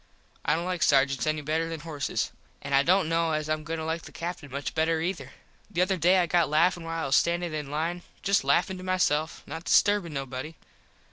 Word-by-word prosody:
I - - +2
dont 170 +2 -2
like 180 -2 -2
sargents 135 0 +3
any 155 0 0
better 160 +3 -1
than 165 -2 -5
horses. 155 -4 -2 0.3
An 140 - -4
I 135 - +6
dont 180 +3 +3
kno 165 0 +1
as 155 0 -1
Im 155 0 -1
going 165 +2 -4
to 160 - -4
like 160 +1 -2
the - - -12
Captin 165 -3 -6
much 140 +2 -4
better 160 0 +1
ether. 160 -6 -3 0.4
The 180 -3 +1
other 190 +1 +1
day 180 +2 +4
I 180 - +3
got 170 -2 +2
laffin 170 +3 +2
while 165 0 -3
I - - -1
was 135 0 +2
standin 170 -1 +1
in 150 -2 -4
line. 165 +4 -2 0.2
Just 200 -4 +2
laffin 170 +7 +2
to - - -8
myself. 165 -4 0
Not 160 +2 -7
disturbin 205 -5 +3
nobody. 135 +2 -5
160 Hz, 220 wpm, -27 LUFS, 150-175 Hz, 0.4 s, I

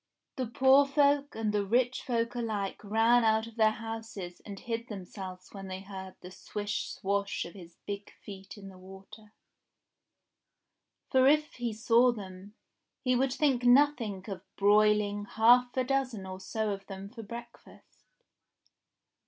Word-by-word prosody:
The 255 -2 -2
poor 265 +4 +5
folk 285 0 +2
and 220 -2 -1
the 205 -1 +1
rich 245 +5 +1
folk 235 -1 -1
alike 215 -5 -3
ran 225 +3 +3
out 220 0 +3
of 230 -1 -12
their 220 -2 +4
houses 220 -5 -7
and 200 -2 -9
hid 230 -1 -4
themselves 185 -2 -8
when 195 -1 -8
they 185 0 -6
heard 190 -1 -9
the 180 - -10
swish 205 +2 -4
swash 200 +1 -2
of 170 - -10
his 175 -4 -13
big 200 0 -5 0.2
feet 195 0 -10
in 195 -1 -10
the 185 -1 -14
water; 195 +3 -14 1.8
for 260 0 +5
if 300 +1 +3
he 240 -2 -3
saw 235 +3 +4
them, 200 -2 -10 0.5
he 255 -2 +2
would 260 +1 +1
think 270 -4 +1
nothing 245 -7 +3
of 195 -3 -6
broiling 205 0 +3
half 245 +4 +4
a 255 - +3
dozen 255 -6 -1
or 185 0 -7
so 210 +3 -2
of 195 -1 -6
them 195 0 -7
for 230 +2 -10
breakfast. 235 +3 -12
215 Hz, 155 wpm, -30 LUFS, 195-245 Hz, 1.8 s, poor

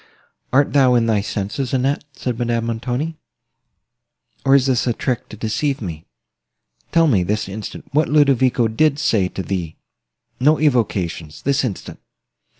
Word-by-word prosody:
"Art 140 +2 +3
thou 130 -3 +5
in 120 -1 +3
thy 110 -3 +2
senses, 105 +7 -3
Annette?" 135 +3 0
said 125 -3 -4
Madame 120 -1 0
Montoni; 125 +7 -3 1.3
"or 135 0 +5
is 135 -2 +4
this 130 -2 +1
a 120 - +2
trick 125 +1 -3
to 110 - -10
deceive 115 +6 -1
me? 80 -7 -6 0.9
Tell 165 0 +4
me, 115 - +3
this 105 +4 -1
instant, 100 +2 -7
what 150 +2 +2
Ludovico 130 -5 +3
did 140 +6 +2
say 105 -9 +1
to 95 - -6
thee;—no 90 - -3
equivocation;—this 115 - 0
instant." 115 -7 -5
120 Hz, 140 wpm, -20 LUFS, 105-140 Hz, 1.3 s, thou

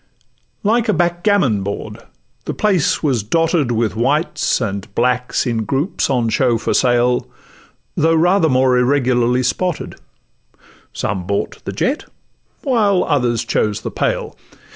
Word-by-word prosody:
Like 225 +2 +1
a - - +4
backgammon 175 - +1
board 100 +1 -5 0.5
the - - -4
place 190 -9 +1
was 130 -7 +1
dotted 165 - +1
With 110 -3 0
whites 145 +6 0
and 100 -5 -4
blacks, 125 +2 0
in 115 -3 -1
groups 140 - -1
on 120 -4 +1
show 120 0 +2
for - - -2
sale, 125 0 +2 0.7
Though 165 +1 +2
rather 175 +1 +3
more 130 -1 +3
irregularly 125 -1 +2
spotted: 180 +7 -2 1.0
Some 90 -2 -3
bought 100 0 -3
the - - -3
jet, 260 - -1 0.6
while 210 -9 +2
others 120 -4 0
chose 105 -2 0
the - - -5
pale. - - -2
130 Hz, 130 wpm, -18 LUFS, 120-170 Hz, 1.0 s, a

